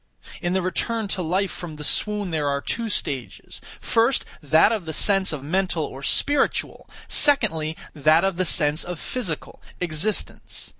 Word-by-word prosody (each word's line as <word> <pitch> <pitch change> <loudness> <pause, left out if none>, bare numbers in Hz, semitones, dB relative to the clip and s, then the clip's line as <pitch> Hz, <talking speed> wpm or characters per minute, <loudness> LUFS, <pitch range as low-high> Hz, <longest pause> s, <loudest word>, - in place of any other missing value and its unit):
In 175 -1 -1
the 190 -1 0
return 220 +4 -1
to 195 - -2
life 185 +3 0
from 165 -3 -7
the 150 - -8
swoon 205 +4 -1
there 150 -3 0
are 140 0 0
two 230 +9 -3
stages; 135 - -4 0.2
first, 230 +3 +1 0.2
that 155 +7 +4
of 215 -6 -2
the 160 - -5
sense 195 +1 +3
of 150 -4 -5
mental 180 +1 0
or 135 - -9
spiritual; 285 - 0 0.2
secondly, 165 - +2 0.2
that 155 +3 +3
of 195 -2 0
the 185 - +1
sense 155 -2 +5
of 175 -2 -6
physical, 190 -12 -4 0.2
existence. 180 +4 -1
180 Hz, 160 wpm, -23 LUFS, 155-205 Hz, 0.2 s, sense